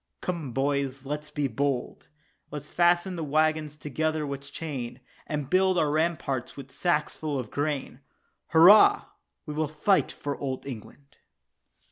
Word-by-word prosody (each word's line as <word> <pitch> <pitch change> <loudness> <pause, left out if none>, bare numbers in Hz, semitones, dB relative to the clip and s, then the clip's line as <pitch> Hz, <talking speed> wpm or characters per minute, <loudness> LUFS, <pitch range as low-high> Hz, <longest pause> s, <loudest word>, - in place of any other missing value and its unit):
"Come, 165 -7 -4
boys, 135 0 -1
let's 150 +2 -4
be 145 -2 -1
bold; 135 +1 -2 0.4
Let's 145 0 -8
fasten 175 +1 +2
the 165 - -3
waggons 155 0 +1
together 155 +2 -1
with 140 0 -6
chain, 135 -6 -5 0.3
And 150 -3 -3
build 185 +3 +3
up - - +4
our 150 - 0
ramparts 155 -6 -1
with 135 -1 -9
sacks 155 -2 0
full 150 -3 -3
of 125 -5 -5
grain." 145 -3 -2 0.5
"Hurrah, 205 - +7 0.4
we 150 - -5
will 155 +1 0
fight 155 +6 +2
for 145 -1 -4
Old 130 -2 -4
England." 140 +2 -10
150 Hz, 145 wpm, -27 LUFS, 140-160 Hz, 0.5 s, Hurrah